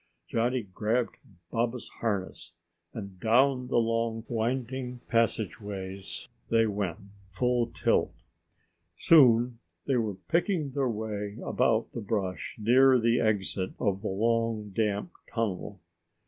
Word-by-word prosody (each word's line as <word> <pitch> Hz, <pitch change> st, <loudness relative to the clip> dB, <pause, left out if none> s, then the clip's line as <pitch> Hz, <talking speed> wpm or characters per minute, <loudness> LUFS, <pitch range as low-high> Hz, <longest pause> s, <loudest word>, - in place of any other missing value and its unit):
Johnny 120 Hz, +1 st, 0 dB
grabbed 110 Hz, +5 st, -1 dB, 0.3 s
Baba's 120 Hz, +1 st, -1 dB
harness, 95 Hz, -5 st, -3 dB, 0.4 s
and 100 Hz, -4 st, -8 dB
down 125 Hz, +4 st, +3 dB
the -, -, +1 dB
long 115 Hz, 0 st, 0 dB
winding 125 Hz, +2 st, -2 dB
passageways 100 Hz, -5 st, -2 dB, 0.2 s
they 115 Hz, 0 st, +4 dB
went, 100 Hz, -6 st, -2 dB, 0.3 s
full 125 Hz, +4 st, +1 dB
tilt. -, -, +1 dB, 0.9 s
Soon 125 Hz, -6 st, +5 dB, 0.3 s
they 135 Hz, -, +2 dB
were 110 Hz, -4 st, -1 dB
picking 165 Hz, -, 0 dB
their 135 Hz, -1 st, 0 dB
way 105 Hz, -2 st, -4 dB
about 115 Hz, 0 st, +1 dB
the 120 Hz, -, -4 dB
brush 100 Hz, -2 st, -3 dB
near 130 Hz, +4 st, +5 dB
the 115 Hz, 0 st, +2 dB
exit 100 Hz, -4 st, 0 dB
of 100 Hz, -4 st, 0 dB
the 105 Hz, -, -3 dB
long, 115 Hz, +1 st, 0 dB
damp 105 Hz, -, -1 dB, 0.2 s
tunnel. 105 Hz, -3 st, -3 dB
115 Hz, 115 wpm, -29 LUFS, 100-125 Hz, 0.9 s, Soon